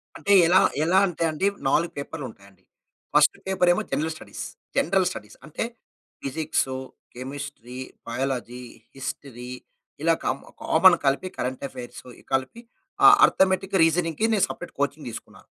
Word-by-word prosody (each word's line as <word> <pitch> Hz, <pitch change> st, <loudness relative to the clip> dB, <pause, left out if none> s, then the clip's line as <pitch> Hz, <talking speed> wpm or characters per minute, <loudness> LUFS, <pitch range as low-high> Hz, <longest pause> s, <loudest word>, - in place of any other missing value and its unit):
అంటే 200 Hz, -, +1 dB
ఎలా, 185 Hz, +2 st, +6 dB, 0.2 s
ఎలా 185 Hz, +3 st, +4 dB
అంటే 170 Hz, -1 st, -3 dB
అండి 175 Hz, +6 st, 0 dB, 0.2 s
4 170 Hz, +4 st, +2 dB
పేపర్లు 140 Hz, -1 st, -5 dB
ఉంటాయి 100 Hz, -2 st, -16 dB
అండి. 95 Hz, -, -27 dB, 0.5 s
ఫస్ట్ -, -, +5 dB
పేపర్ 185 Hz, -2 st, +2 dB
ఏమో -, -, -1 dB
జనరల్ 155 Hz, +3 st, -1 dB
స్టడీస్. -, -, -8 dB, 0.3 s
జనరల్ 185 Hz, +2 st, +3 dB
స్టడీస్ 105 Hz, 0 st, -9 dB
అంటే 155 Hz, -, -4 dB, 0.6 s
ఫిజిక్స్, 150 Hz, +1 st, -1 dB, 0.5 s
కెమిస్ట్రీ, 130 Hz, -1 st, -7 dB, 0.3 s
బయాలజీ, 125 Hz, 0 st, -3 dB, 0.3 s
హిస్టరీ 130 Hz, -2 st, -7 dB, 0.5 s
ఇలా 165 Hz, +1 st, +4 dB
కామ్ 135 Hz, -, -1 dB, 0.2 s
కామన్ 175 Hz, +2 st, +6 dB
కలిపి 140 Hz, +7 st, +1 dB
కరెంట్ 130 Hz, +2 st, -3 dB
అఫైర్స్ 125 Hz, -2 st, -9 dB, 0.3 s
కలిపి 135 Hz, -, -1 dB, 0.6 s
అర్థమటిక్ 190 Hz, +1 st, +1 dB
రీజనింగ్ 165 Hz, +1 st, +1 dB
నేను 205 Hz, -, +4 dB
సపరేట్ -, -, -8 dB
కోచింగ్ -, -, -2 dB
తీసుకున్నాను. -, -, -11 dB
150 Hz, 130 wpm, -25 LUFS, 130-180 Hz, 0.6 s, ఎలా